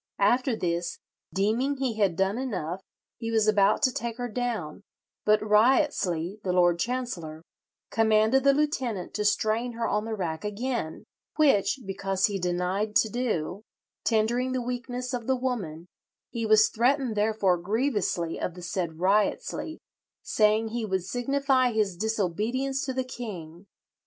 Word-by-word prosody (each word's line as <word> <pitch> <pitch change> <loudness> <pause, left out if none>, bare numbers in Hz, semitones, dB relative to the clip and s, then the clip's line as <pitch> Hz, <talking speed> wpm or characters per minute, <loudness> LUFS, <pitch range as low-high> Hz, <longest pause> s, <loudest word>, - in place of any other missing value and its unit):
After 240 +5 +2
this, 170 -3 -2 0.3
deeming 230 +9 +1
he 255 -4 -2
had 195 -5 +2
done 195 +5 0
enough, 190 -8 -3 0.4
he 230 - -3
was 220 -2 +2
about 205 +2 +3
to 260 - +4
take 235 0 -4
her 245 -1 -3
down, 225 -9 -3 0.4
but 215 0 +5
Wriottesley, 210 - +2
the 185 - 0
Lord 175 -1 +3
Chancellor, 175 -10 -3 0.5
"commanded 220 +3 +3
the 280 - +6
lieutenant 260 - -1
to 210 - -1
strain 215 +3 +1
her 230 0 -2
on 210 +1 0
the 225 -1 -3
rack 165 -5 -3
again; 210 -4 -3 0.3
which, 275 -4 +3
because 195 0 0
he 200 -2 -1
denied 180 +4 -1
to 220 - +4
do, 210 -6 -2 0.4
tendering 240 +3 +1
the 255 - 0
weakness 250 +1 -4
of 240 -2 -3
the 265 - +3
woman, 200 -11 -3 0.5
he 230 -2 -2
was 215 0 +6
threatened 250 0 +1
therefore 205 -4 +2
grievously 200 -4 -1
of 180 - -3
the 180 - -10
said 175 -2 -3
Wriottesley, 210 - 0 0.5
saying 215 +1 +2
he 235 +1 -3
would 190 -4 -1
signify 260 +2 +1
his 210 -4 +1
disobedience 220 +7 -1
to 265 - -2
the 260 0 -1
king. 195 -8 -8
215 Hz, 145 wpm, -27 LUFS, 190-245 Hz, 0.5 s, the